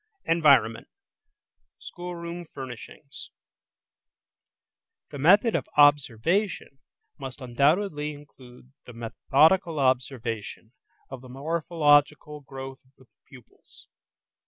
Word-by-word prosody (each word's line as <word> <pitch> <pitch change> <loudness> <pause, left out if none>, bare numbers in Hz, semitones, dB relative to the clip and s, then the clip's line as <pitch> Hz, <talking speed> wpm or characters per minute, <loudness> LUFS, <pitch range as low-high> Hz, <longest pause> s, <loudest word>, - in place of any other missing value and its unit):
ENVIRONMENT: 135 -9 +3 0.9
SCHOOLROOM 175 -1 -8
FURNISHINGS 130 +2 -10 1.8
The 145 - -8
method 200 - +4
of - - -3
observation 145 - +2 0.4
must 135 -2 -8
undoubtedly 150 +5 0
include 130 -3 -16 0.2
the 125 - -10
methodical 155 - +1
observation 120 -4 -2 0.4
of 130 -2 -8
the 130 - -14
morphological 150 0 +1
growth 135 -1 -9
of 130 +1 -32
the 130 - -21 0.2
pupils. 130 -4 -17
140 Hz, 85 wpm, -25 LUFS, 130-160 Hz, 1.8 s, method